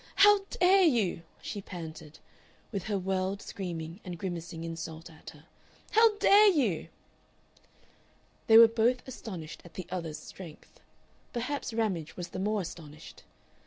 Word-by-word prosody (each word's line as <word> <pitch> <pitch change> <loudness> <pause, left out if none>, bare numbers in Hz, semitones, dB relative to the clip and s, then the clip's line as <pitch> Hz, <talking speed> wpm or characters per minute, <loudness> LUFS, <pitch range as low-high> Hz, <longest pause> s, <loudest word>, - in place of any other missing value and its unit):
"How 410 +1 +7
dare 375 +2 +4
you!" 230 - +2 0.2
she 205 - -5
panted, 160 -4 -9 0.5
with 200 -5 -4
her 210 -2 -1
world 190 +1 -1
screaming 170 -3 -6
and 180 -3 -6
grimacing 170 -2 -5
insult 165 0 -7
at 160 - -12
her. 150 -1 -15 0.5
"How 445 -1 +5
dare 415 +1 +7
you!" 260 - +1 1.6
They 225 - +8
were 230 0 +10
both 235 +3 +1
astonished 185 -11 -8
at 175 - -15
the 185 - -5
other's 165 -4 -4
strength. 160 +1 -12 0.5
Perhaps 250 +3 -3
Ramage 200 -9 -2
was 175 -1 -5
the 185 - -6
more 210 +1 0
astonished. 155 -3 -10
190 Hz, 135 wpm, -30 LUFS, 165-230 Hz, 1.6 s, were